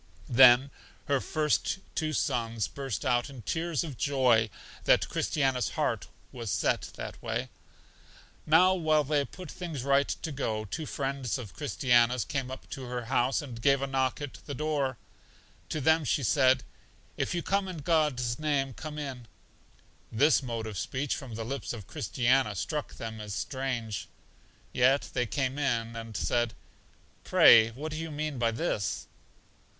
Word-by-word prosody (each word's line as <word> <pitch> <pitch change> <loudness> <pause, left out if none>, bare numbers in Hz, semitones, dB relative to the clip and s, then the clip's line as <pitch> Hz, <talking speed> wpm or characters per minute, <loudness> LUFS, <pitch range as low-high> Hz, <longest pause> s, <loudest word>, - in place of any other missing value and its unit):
Then 130 +2 +7 0.3
her 140 -2 +1
first 155 +4 0 0.2
two 155 -1 -1
sons 115 -7 -1
burst 135 -3 -5
out 120 -1 +1
in 130 -5 -10
tears 165 - -1
of 145 -7 -7
joy 125 -6 +3 0.4
that - - +4
Christiana's 135 -4 0
heart - - 0 0.2
was 115 -4 -6
set - - 0
that - - -7
way. - - -3 1.0
Now 180 +4 +6
while 155 -4 +2
they 145 0 +1
put 180 +5 -10
all - - -13
things 165 -8 -5
right 140 0 +3
to 160 - -4
go, 110 -6 -2
two 155 +9 -5
friends 135 -3 -2
of 115 -7 -8
Christiana's 125 -5 +2
came 135 -2 -3
up 130 - -8
to 130 - -6
her 120 -1 -4
house, 130 +3 +2
and 120 -5 -8
gave 140 +2 +4
a - - +2
knock 130 -1 0
at 145 -2 -6
the 145 - -4
door. 145 -4 -1 0.7
To 155 - -2
them 160 +3 +3
she 140 0 0
said, 130 +1 +4 0.5
If - - -1
you 170 - -1
come 195 0 0
in 185 -2 -5
God's 145 -6 +1
name, 140 -3 0
come 150 +4 -7
in. 135 -5 -6 0.8
This 145 +8 +4
mode 115 -4 -4
of 105 -4 -5
speech 135 +8 -2
from 125 -5 -7
the 115 0 -4
lips 135 +2 -4
of 110 -5 -8
Christiana 125 +2 +1
struck 150 - -3
them 110 -1 -6
as 105 -2 -5
strange. 125 -6 -3 0.7
Yet 130 +3 +3
they 125 -2 0
came 130 +6 -1
in, 115 -5 0
and 115 -2 -6
said, 120 -2 0 0.7
Pray 115 -1 +7
what 145 +7 -6
do 155 - -4
you 165 0 -4
mean 150 -3 -3
by 115 -1 +3
this? 110 -3 -2
130 Hz, 165 wpm, -29 LUFS, 120-150 Hz, 1.0 s, Then